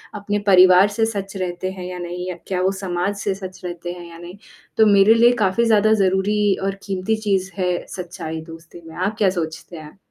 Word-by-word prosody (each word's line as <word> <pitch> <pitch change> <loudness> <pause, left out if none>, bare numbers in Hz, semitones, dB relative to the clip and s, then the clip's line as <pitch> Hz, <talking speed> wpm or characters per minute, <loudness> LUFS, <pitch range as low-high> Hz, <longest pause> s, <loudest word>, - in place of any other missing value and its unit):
अपने 205 0 -2
परिवार 185 0 +7
से 220 +2 0
सच 200 -3 -5
रहते 185 0 -3
हैं 185 -1 -8
या 180 0 -6
नहीं? 175 +1 -5
या 180 - -4
क्या 185 -1 -1
वो 190 +1 +2
समाज 185 +2 -2
से 195 -1 -2
सच 185 -1 -9
रहते 175 0 -5
हैं 175 -1 -10
या 165 - -12
नहीं? 175 +3 -11 0.4
तो 220 - +6
मेरे 205 +1 +6
लिए 235 +1 +5
काफ़ी 195 +5 +2
ज़्यादा 215 -1 +4
ज़रूरी 195 +2 +1
और 195 0 -1
क़ीमती 195 +2 -1
चीज़ 195 -2 0
है 180 -2 -1
सच्चाई 165 -3 -6
दोस्ती 165 +1 -13
में। 160 - -11
आप 195 +4 -2
क्या 200 -3 +4
सोचते 165 -1 -5
हैं? 155 +4 -12
185 Hz, 210 wpm, -20 LUFS, 175-200 Hz, 0.4 s, परिवार